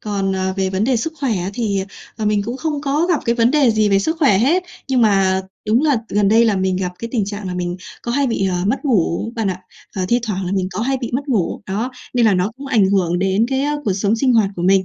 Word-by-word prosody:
Còn, 200 -2 -2
ờ, 190 0 -1
về 190 -1 0
vấn 190 +2 0
đề 255 +1 +2
sức 320 +8 -2
khỏe 250 -8 0
á 180 +2 -3
thì, 200 -5 -1 0.3
ờ, 220 - -3
mình 210 -1 +1
cũng 240 +4 -4
không 300 -1 -2
có 295 +4 0
gặp 340 -5 +1
cái 235 - +1
vấn 235 0 +3
đề 285 -4 +4
gì 215 -1 +2
về 195 -1 +4
sức 320 +12 -1
khỏe 270 - +4
hết. 315 - +2 0.3
Nhưng 260 -2 +2
mà 195 -3 +3 0.3
đúng 225 +5 +3
là 295 -4 +3
t - - 0
gần 205 -1 +2
đây 225 +3 +5
là 215 -4 +2
mình 190 0 0
gặp 180 -1 -2
cái 230 - -5
tình 220 -5 +1
trạng 205 0 -6
là 180 - -4
mình 175 0 -3 0.3
có 235 - -3
hay 280 +1 +1
bị, 225 -5 0
ờ, 180 - -1
mất 265 +9 -1
ngủ 220 - 0
bạn 220 -3 0
ạ. 185 0 -5 0.4
Và, 185 - 0
thi 240 - +3
thoảng 200 -4 -3
là 180 - -2
mình 185 -2 0
có 190 - -3
hay 270 +3 0
bị 240 - -4
mất 280 +3 -2
ngủ, 215 -10 0
đó, 215 +6 -2 0.2
nên 240 -2 +4
là 210 - +4
nó 180 +3 0
cũng 275 - -9
ảnh 220 -7 +3
hưởng 175 -3 +1
đến 195 +4 +1
cái, 265 0 0
á, 295 +1 0
cuộc 200 - +1
sống 200 +3 0
sinh 255 +2 +2
hoạt 220 -4 +3
của 175 - -3
mình. 190 +1 +4
215 Hz, 290 wpm, -19 LUFS, 190-250 Hz, 0.4 s, đây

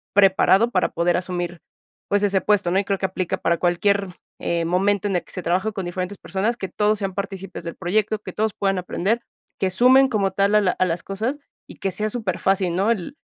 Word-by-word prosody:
preparado 200 +3 +5
para 185 - +1
poder 170 +1 +1
asumir, 175 -1 -4 0.5
pues 205 0 +2
ese 195 -1 +3
puesto, 205 -4 +2
¿no? 190 - +3
Y 200 - -2
creo 195 -1 0
que - - -1
aplica 185 -1 -2
para 170 0 +1
cualquier, 195 +3 +1 0.3
eh, 170 -1 -1
momento, 195 +4 +1
en 195 - -1
el - - -3
que - - -14
se 185 - -5
trabaja 190 +6 0
con 195 -4 -4
diferentes 185 +3 -4
personas, 205 +5 -1
que 190 - -5
todos 210 +2 +1
sean 195 -1 -3
partícipes 195 -2 -5
del 170 - -5
proyecto, 210 +4 0
que - - -8
todos 215 -1 0
puedan 195 -1 0
aprender, 200 +6 -1 0.4
que 190 - +1
sumen 260 +6 +6
como 200 -4 +1
tal 200 +1 +2
a 210 - +6
la 185 -2 +2
a 185 - 0
las 170 0 -2
cosas 225 +9 -3 0.3
y - - -12
que 195 - -2
sea 215 +3 -1
superfacil, 190 -5 0
¿no? 195 +4 +1
El 230 - -3
195 Hz, 220 wpm, -22 LUFS, 180-210 Hz, 0.5 s, sumen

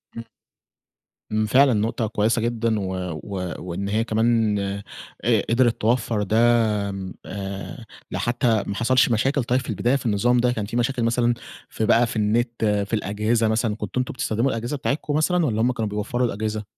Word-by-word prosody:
امم. 115 - -6 1.1
امم، 110 0 +1
فعلًا 130 +4 +5
نقطة 110 +1 0
كويّسة 110 +2 +1
جدًا، 115 -1 0
و 95 -1 -3 0.3
و 90 -3 -4
وإن 90 +3 -4
هي 110 +2 +1
كمان 110 -1 +2 0.7
ق - - +3
قدرت 120 0 +2
توفر 115 -2 +1
ده 105 +2 0 0.5
امم 95 -2 -6
آآ، 100 +4 -6 0.3
لحتى 120 -2 +1
ما 100 - -3
حصلش 125 +3 +3
مشاكل 135 +4 +1
طيّب 125 +2 +1
في 125 - -8
البداية 120 +3 +1
في 140 - -3
النظام 115 +3 +2
ده، 125 0 +2
كان 110 -4 -2
في 115 +3 -4
مشاكل 120 0 0
مثلًا 120 +1 +2 0.4
في 110 - -2
بقى 115 +3 +4
في 115 - -6
النت 115 +2 0
في 105 0 0
الأجهزة 110 +2 +1
مثلًا، 110 0 0
كنتوا 105 +3 -4
أنتم 125 - -4
بتستخدموا 120 0 0
الأجهزة 120 +5 -3
بتاعتكم 145 +2 -2
مثلًا 170 +2 +2
والّا 110 -5 0
هم 125 +2 +3
كانوا 115 -4 -2
بيوفروا 115 +4 -1
الأجهزة؟ 110 0 -3
115 Hz, 175 wpm, -23 LUFS, 105-120 Hz, 1.1 s, فعلًا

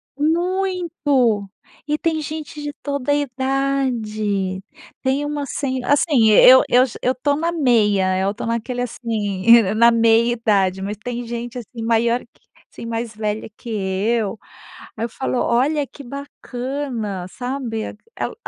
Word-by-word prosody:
Muito, 320 - 0 0.4
e 300 0 0
tem 320 0 -1
gente 305 0 -6
de 290 0 -5
toda 280 -1 -2
a - - +4
idade. 245 -8 -1 0.4
Tem 270 +2 +1
uma 290 0 -3
sen 260 -2 -3
assim, 275 -3 +3
eu 255 +5 +8
eu 250 +1 +5
já 245 - -9
eu 255 - +2
tô 285 +3 0
na 330 +3 -1
meia, 205 - +2
tô - - -6
naquele 235 +2 -2
assim, 225 -2 +3
na 235 +1 +6
meia-idade 225 -4 +2
mas 205 +2 -4
tem 240 +2 -5
gente 240 +1 -5
assim 235 0 -7
maior 230 +1 +2
que - - -23 0.3
assim, - - -9
mais 230 0 -4
velha 215 0 -3
que 240 - -10
eu. 210 +1 -1 0.6
Aí 225 - -2
eu - - -2
falo: 255 +2 -3
“Olha 280 +5 +1
que 280 - -13
bacana”, 250 -6 -5
sabe? 245 0 -4 0.3
Ela - - -3
240 Hz, 140 wpm, -20 LUFS, 220-280 Hz, 0.6 s, eu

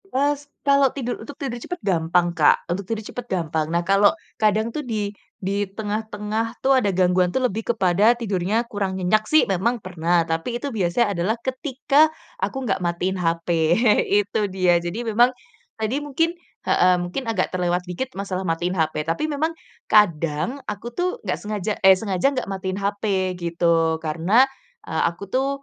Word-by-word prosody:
Terus, 290 -3 -1 0.2
kalau 280 -1 +5
tidur 245 -2 -4
untuk 285 - -10
tidur 245 -4 -5
cepat 355 - -5
gampang 175 -1 +2
Kak, 155 -3 +3
untuk 180 +2 -4
tidur 220 -2 -3
cepat 245 +2 -7
gampang. 160 -4 -1
Nah 170 +1 0
kalau 195 +2 +5 0.3
kadang 215 +2 +2
tuh 305 - -2
di 215 -6 -3 0.3
di 200 +2 -1
tengah-tengah 215 +2 -3
tuh 270 - +4
ada 215 -6 +2
gangguan 180 0 +3
tuh 260 - +1
lebih 225 +1 -1
kepada 200 +2 +4
tidurnya 210 0 -1
kurang 195 -4 -2
nyenyak 215 +4 +2
sih 310 0 +5
memang 205 +6 +1
pernah, 175 -1 +1
tapi 165 +9 -2
itu 280 +4 -4
biasanya 205 +2 +1
adalah 200 +7 0
ketika 275 +3 +2 0.3
aku - - -2
nggak 195 -4 -1
matiin 180 +2 -1
HP, 165 0 -1 0.8
itu 210 - -2
dia. 185 -2 +3
Jadi 180 +8 -4
memang 230 +2 +4 0.5
tadi 220 +4 -1
mungkin 310 +4 0 0.3
heeh, 180 0 +4 0.3
agak 195 -5 0
terlewat 180 -1 0
dikit 245 +9 -3
masalah 190 -1 -4
matiin 175 +2 -1
HP 155 -1 0
tapi 165 - -1
memang 310 +1 0 0.4
kadang 170 - +2
aku 210 +3 -6
tuh 365 - -1
nggak - - -1
sengaja 210 -1 -3
eh 190 0 +7
sengaja 195 +4 +1
nggak - - -1
matiin 190 0 -3
HP 200 -2 -1
gitu 170 -2 +1
karena, 165 +10 +3 0.4
eee, - - -1
aku 175 +4 -9
tuh 260 +5 +1
200 Hz, 165 wpm, -23 LUFS, 175-235 Hz, 0.8 s, eh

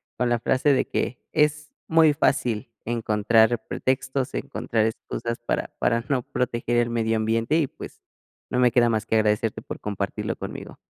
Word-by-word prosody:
con 125 -1 0
la 120 - +2
frase 130 +5 +2
de 135 - +2
que 125 - -2
es 150 -1 +1 0.2
muy 160 -2 +5
fácil 120 -6 0 0.2
encontrar 115 0 +3
pretextos, 130 0 -1
encontrar 110 -2 -1
excusas 115 +1 -4
para 120 - -2
para 115 0 +1
no 135 -3 +2
proteger 120 -1 -1
el 120 0 +2
medio 115 -1 +1
ambiente 115 +6 +1
y, 160 - +3
pues, - - -11 0.5
no 125 - +1
me 125 -1 +5
queda 120 0 +4
más 110 -1 -1
que - - +1
agradecerte 110 0 +1
por - - -7
compartirlo 100 -1 -3
conmigo. - - -8
120 Hz, 165 wpm, -24 LUFS, 110-130 Hz, 0.5 s, muy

